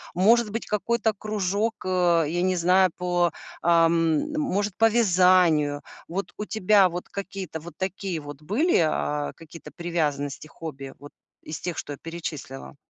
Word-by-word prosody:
Может 220 +4 +4
быть 225 +2 -4
какой-то 220 +1 0
кружок, 210 +1 -1
э, 175 -3 +3
я 175 +2 -1
не 185 0 +1
знаю, 180 +2 +4
по, 175 -2 +1 0.3
ам, 165 - +3
может 205 -10 -1
по 225 0 +5
вязанию. 180 -9 +4 0.3
Вот 175 0 -4
у 210 - -4
тебя 205 -2 +4
вот 175 +1 -6
какие-то 195 -4 -6
вот 170 +2 -11
такие 190 -2 -3
вот 145 0 -10
были, 245 - +2
а, 150 -2 0
какие-то 165 0 -12
привязанности, 155 -5 -2
хобби, 140 -4 -8
вот 145 +1 -12 0.3
из 155 - -6
тех, 175 -2 -4
что - - -5
я - - -9
перечислила? 160 -6 -7
175 Hz, 150 wpm, -25 LUFS, 160-200 Hz, 0.3 s, по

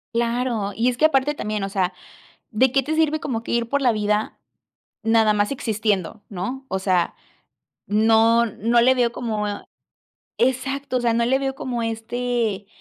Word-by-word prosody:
Claro, 235 -3 -1
y 235 +3 +2
es 245 - -3
que 305 - +4
aparte, 295 -1 +2
también, 215 -5 -3
o 195 - -2
sea, 190 -2 -1 0.6
¿de 245 +3 +2
qué 270 0 +3
te 310 +4 -2
sirve 310 -1 +2
como 230 -5 -3
que - - -4
ir 235 -1 0
por 280 +3 0
la 250 -3 +3
vida 210 0 -1 0.6
nada 225 -1 +4
más 205 0 +1
existiendo, 215 -6 -2
no?, 215 +8 -5
o 190 - -1
sea, 185 -2 +1 0.7
no 225 +2 +4
no 230 +2 +1
le 255 +2 +5
veo 245 -2 +2
como, 215 -4 -2
eh 205 0 -5 0.8
exacto. 265 +1 0
O - - -3
sea, 235 -1 +2
no 235 +1 +1
le 265 +2 +2
veo 270 -1 -2
como, 245 -3 -3
este 225 -2 -2
230 Hz, 180 wpm, -22 LUFS, 210-255 Hz, 0.8 s, le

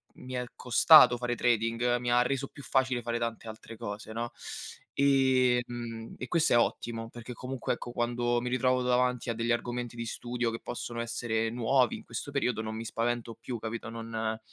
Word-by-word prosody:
mi 130 0 -9
è 125 0 -1
costato 125 0 +7
fare 120 0 -1
trading, 120 +1 +2
mi 120 0 -1
ha 125 0 +5
reso 135 +1 -1
più 140 - -13
facile 130 -3 +1
fare 120 0 -1
tante 115 -1 -3
altre 110 0 -9
cose, 110 -1 -6
no? 120 +1 -3 0.6
Ehm, 125 -4 +2
e 125 - -4
questo 165 -6 +2
è - - +6
ottimo 115 -1 -1
perché 120 +1 -8
comunque, 125 +1 -3
ecco, 120 - -7
quando 120 0 0
mi 125 - -2
ritrovo 125 0 +2
davanti 125 -1 +1
a - - -1
degli 115 +1 -1
argomenti 120 0 -2
di 115 - -4
studio 120 +1 -2
che 115 - -5
possono 120 -1 -5
essere 115 -1 -1
nuovi 125 +1 +2
in - - -9
questo 115 +4 -6
periodo 125 -5 0
non 110 0 -4
mi 115 +1 -5
spavento 115 +1 -2
più, 120 -2 -5
capito? 115 +1 -5
Non 115 -1 -3
120 Hz, 185 wpm, -30 LUFS, 115-125 Hz, 0.6 s, costato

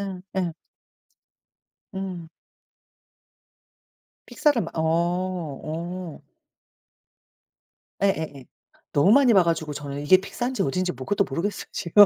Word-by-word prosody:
예 195 -2 -4 0.2
예. 175 -3 -2 1.4
음. 185 -4 -5 2.0
픽사를 290 -7 +2
막 - - -5
어 160 - 0
어. 170 0 -2 1.8
예예예. 160 -9 0 0.5
너무 165 +8 +5
많이 265 -2 +6
봐 190 -3 +7
가지고 160 -3 -1
저는 140 0 -5
이게 150 +6 +6
픽사인지 240 +7 -2
어딘지 180 +6 0
뭐 130 0 -8
그것도 200 -1 +2
모르겠어요 170 +9 -2
지금. 205 +5 +6
175 Hz, 210 characters per minute, -25 LUFS, 160-195 Hz, 2.0 s, 봐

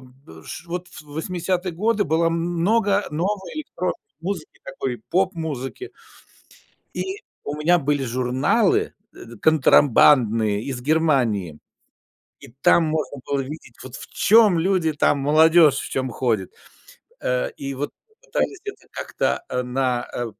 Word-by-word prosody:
б 125 - -16
ш - - -8
Вот 180 +1 -5
в - - -12
80 175 +4 -3
годы 210 +4 +1
было 160 +1 +1
м 165 - +1 0.3
много 205 +1 +2
новой 195 - -3
про 180 0 0 0.3
музыки 195 +4 -5
такой, - - -5
поп-музыки. 170 - -2 1.1
И 390 +2 -4 0.2
у 145 - -4
меня 175 +4 +3
были 145 -2 0
журналы, 130 - +1 0.2
э, 120 0 -11
контрабандные 115 -8 +4
из 130 -2 -5
Германии. 125 - +1 0.8
И - - -13
там 170 - +5
можно 155 -2 -2
было 140 -1 0
видеть, 135 -3 -8
вот 130 -1 -9
в - - -9
чём 215 -5 +5
люди 175 -2 +1
там, 145 0 +2
молодежь 155 +2 +5
в - - -6
чём 130 -1 -2
ходит. 115 -6 -1 0.7
Э, 125 0 0
и 140 0 -5
вот 140 +2 -4 0.3
пытались 405 -5 -2
это 410 - -8
как-то, - - -2
э, 125 - -1
на, 125 -1 -1
э, 120 - -2
155 Hz, 135 wpm, -22 LUFS, 130-180 Hz, 1.1 s, там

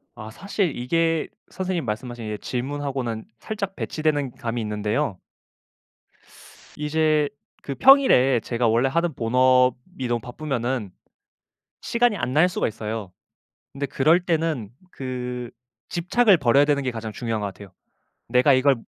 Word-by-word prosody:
아 110 -1 -9
사실 195 - -2
이게 165 +6 +1 0.2
선생님 185 -5 -3
말씀하신 110 -1 -4
질문하고는 130 -3 -3
살짝 200 -3 -4
배치되는 145 -4 -1
감이 120 -2 -3
있는데요. 105 -3 -2 1.6
이제 150 0 +1 0.3
그 140 - -4
평일에 195 - +6
제가 120 +1 0
원래 115 +4 +3
하던 170 +3 0
본업이 125 +4 +2
너무 120 0 0
바쁘면은 125 -4 -3 0.9
시간이 235 -2 +1
안 125 -8 -2
날 155 +6 +5
수가 180 - -1
있어요. 110 -3 -5 0.6
근데 140 +1 -3
그럴 160 +6 +2
때는 160 - -1 0.2
그 125 -2 -5 0.4
집착을 185 +3 +3
버려야 140 +1 +4
되는 145 -1 +1
게 130 - -1
가장 115 -2 -6
중요한 115 -1 -3
것 100 - -1
같아요. 100 -1 -11 0.6
내가 125 +4 +5
이걸 130 +1 +4
130 Hz, 280 characters per minute, -24 LUFS, 120-155 Hz, 1.6 s, 평일에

